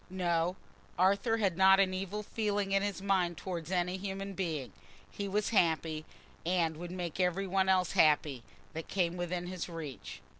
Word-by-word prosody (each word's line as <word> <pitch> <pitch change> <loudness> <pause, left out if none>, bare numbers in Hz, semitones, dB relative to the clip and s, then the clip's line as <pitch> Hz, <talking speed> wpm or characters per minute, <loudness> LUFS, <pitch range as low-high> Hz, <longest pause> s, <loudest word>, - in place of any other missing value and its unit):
No, 175 -1 0 0.4
Arthur 200 +5 +3
had 195 -6 +1
not 190 0 +7
an 190 -1 +3
evil 195 +3 -3
feeling 205 -2 -1
in 195 0 +3
his 200 -1 -3
mind 185 -4 +1
towards 170 -4 -5
any 180 0 0
human 195 0 -5
being: 160 -8 -3 0.4
he 200 - -4
was 205 +1 0
happy, 160 -5 +1 0.4
and 170 -2 +1
would 175 +1 -6
make 175 -1 -5
every 180 +2 +1
one 190 0 +1
else 185 -2 +3
happy 150 -4 +3 0.3
that 160 0 -6
came 175 -3 0
within 175 0 -3
his 180 -1 -5
reach. 160 -6 -7
185 Hz, 165 wpm, -32 LUFS, 170-195 Hz, 0.4 s, not